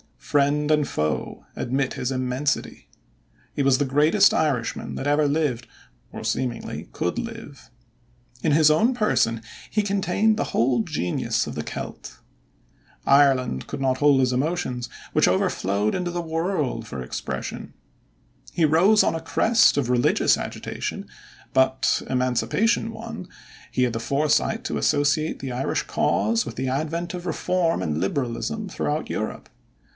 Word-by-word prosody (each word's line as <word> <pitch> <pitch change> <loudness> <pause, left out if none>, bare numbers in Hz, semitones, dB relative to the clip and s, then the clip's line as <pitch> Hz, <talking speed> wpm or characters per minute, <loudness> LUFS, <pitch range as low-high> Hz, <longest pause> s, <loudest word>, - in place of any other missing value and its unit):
Friend 145 - +1
and 150 -2 +3
foe 75 0 -3
admit 130 +2 -1
his 125 - -3
immensity. 130 - -2 0.7
He - - -1
was 135 -1 +4
the 145 - +1
greatest 155 +9 +4
Irishman 140 -7 -1
that - - -4
ever 145 +1 +3
lived 140 -5 -1 0.5
or - - -7
seemingly 125 -2 -3
could 90 - -2
live. 225 - -8 0.7
In 150 - +2
his 155 0 +6
own 225 +12 +3
person 115 - +1 0.3
he 210 - +1
contained 200 +2 +1
the - - 0
whole 120 -1 +2
genius 90 -3 -1
of - - -5
the - - -4
Celt. - - -7 0.9
Ireland 135 - +3
could - - -5
not 130 -1 +1
hold 145 -1 +4
his 130 -1 +2
emotions, 130 -3 -1 0.2
which - - +3
overflowed 100 +3 +1
into 180 -1 -2
the 175 0 -2
world 160 - -2
for 65 -7 -6
expression. 60 - -5 0.8
He 170 - +1
rose 180 +8 +5
on - - +1
the 165 - -2
crest 220 +8 +3
of 140 -4 0
a - - +2
religious 125 -1 +3
agitation, - - -5 0.5
but, 130 0 +2
Emancipation 130 - +1
won, 225 -4 -8 0.4
he 125 - 0
had 125 -2 +1
the 115 - -2
foresight 150 - +1
to 260 - -2
associate 150 +2 +1
the 135 -2 -5
Irish 125 +2 -1
cause 115 +3 +1
with 115 - -7
the 130 +1 -2
advent 160 +6 -2
of 180 -1 -6
Reform 170 0 0
and 75 -1 -1
Liberalism 140 - -2
throughout 150 -2 -2
Europe. 110 - -4
145 Hz, 145 wpm, -24 LUFS, 125-170 Hz, 0.9 s, his